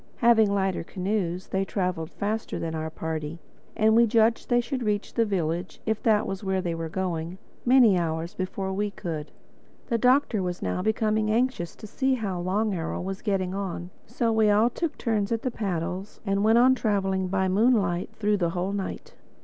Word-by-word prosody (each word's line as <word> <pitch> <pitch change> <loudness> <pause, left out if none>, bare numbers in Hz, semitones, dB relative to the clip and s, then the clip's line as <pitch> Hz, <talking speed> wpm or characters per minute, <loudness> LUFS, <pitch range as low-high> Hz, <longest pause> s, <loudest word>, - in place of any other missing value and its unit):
Having 225 -3 +5
lighter 195 -3 0
canoes, 185 -1 -2
they 190 0 0
traveled 180 -5 -2
faster 215 +4 -3
than 165 -1 -3
our 160 0 -3
party; 160 0 -4 0.4
and 220 0 +4
we 235 0 +6
judged 225 +1 +3
that 240 - +3
they - - +5
should 255 +2 -3
reach 210 -2 -1
the 230 - +2
village—if 185 +3 -2
that 215 -2 +3
was 195 +1 -4
where 190 -1 0
they 175 -2 -2
were 165 -1 -4
going—many 190 +6 +1
hours 165 0 -2
before 190 +1 -3
we 205 +2 -1
could. 160 -6 -5 0.6
The 230 -2 +1
Doctor 250 -3 +3
was 180 -1 -3
now 90 -1 -1
becoming 215 0 +1
anxious 225 -6 0
to - - -11
see 265 +5 0
how 200 -7 -3
Long 200 +4 0
Arrow 165 -3 -3
was 190 +1 -4
getting 190 -3 -1
on, 185 -2 -4 0.2
so 230 -1 0
we 220 -1 +3
all 215 +4 +4
took 335 +5 -3
turns 215 -4 0
at 230 -1 -1
the 255 - -1
paddles 190 -1 -3
and 195 0 +1
went 220 +2 +5
on 255 +2 +6
traveling 195 -5 0
by 190 0 +1
moonlight 195 -3 +2
through 210 -1 +1
the 175 -3 +1
whole 180 +3 -2
night. 200 -2 -5
195 Hz, 185 wpm, -26 LUFS, 180-220 Hz, 0.6 s, we